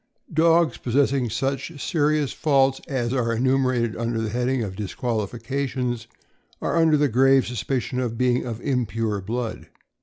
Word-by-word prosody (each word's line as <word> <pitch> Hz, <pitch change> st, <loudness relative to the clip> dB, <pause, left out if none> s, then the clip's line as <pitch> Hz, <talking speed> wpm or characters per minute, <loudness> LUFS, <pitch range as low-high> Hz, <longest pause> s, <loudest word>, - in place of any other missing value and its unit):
— -, -, -18 dB
Dogs 165 Hz, -1 st, +3 dB
possessing 135 Hz, 0 st, +1 dB
such 135 Hz, +6 st, -3 dB
serious 150 Hz, -3 st, +1 dB
faults 135 Hz, -3 st, +2 dB
as 125 Hz, -3 st, -1 dB
are 120 Hz, -3 st, 0 dB
enu 130 Hz, +3 st, +2 dB
merated 125 Hz, -4 st, 0 dB
under 115 Hz, 0 st, -2 dB
the 110 Hz, -1 st, -2 dB
heading 125 Hz, +1 st, 0 dB
of 95 Hz, -3 st, -5 dB
"Disqualifications" 120 Hz, +3 st, -3 dB, 0.5 s
are -, -, -1 dB
under 165 Hz, -2 st, +4 dB
the 145 Hz, 0 st, +3 dB
grave 135 Hz, +2 st, +4 dB
suspicion 125 Hz, +2 st, -2 dB
of 120 Hz, -3 st, -2 dB
being 125 Hz, 0 st, +2 dB
of 115 Hz, -3 st, -5 dB
impure 115 Hz, -5 st, -1 dB
blood. 115 Hz, +3 st, -4 dB
125 Hz, 150 wpm, -24 LUFS, 115-135 Hz, 0.5 s, under